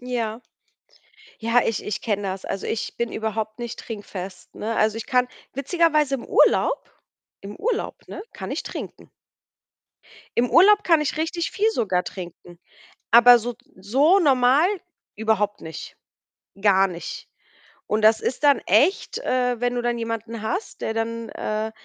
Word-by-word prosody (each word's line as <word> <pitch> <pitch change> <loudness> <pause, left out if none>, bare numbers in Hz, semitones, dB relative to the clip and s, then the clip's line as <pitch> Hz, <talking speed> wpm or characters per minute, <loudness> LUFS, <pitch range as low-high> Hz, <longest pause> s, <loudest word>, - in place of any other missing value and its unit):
Ja. 240 -3 -3 1.0
Ja, 230 +2 +3
ich 225 - -1
ich 210 - -4
kenne 205 -3 -1
das. 190 0 -4
Also, 195 - -4
ich 220 - -3
bin 235 -1 -2
überhaupt 220 0 -3
nicht 235 -2 -6
trinkfest, 195 -4 -8
ne? 225 +2 -3
Also, 215 0 +1
ich 225 - -6
kann 250 -2 +2 0.3
witzigerweise 300 0 +2
im 245 - -8
Urlaub - - +3 0.6
im 200 +1 -8
Urlaub, 465 0 -3
ne, - - -7
kann - - -7
ich - - -2
trinken. - - -8 1.3
Im 245 +1 +2
Urlaub 410 +4 +6
kann 330 -5 +4
ich 300 +1 -2
richtig 330 +1 -2
viel 425 +2 +1
sogar 185 - 0
trinken, 175 -1 -9 0.5
aber 240 +2 +8
so 240 +1 -5 0.2
so 270 - +3
normal 275 +1 +4 0.5
überhaupt 210 -1 0
nicht. 160 -1 -8 0.7
Gar 195 -2 +4
nicht. 175 -2 -7 0.6
Und 215 +1 0
das 220 +1 +5
ist 260 - -3
dann 285 -1 +6
echt, 400 +4 +2
äh, 250 - 0
wenn 245 0 0
du 245 - -2
dann 240 0 -1
jemanden 230 0 -4
hast, 370 - -4
der 220 - -2
dann, 230 0 -3
äh, 215 +1 -3
230 Hz, 150 wpm, -23 LUFS, 215-270 Hz, 1.3 s, aber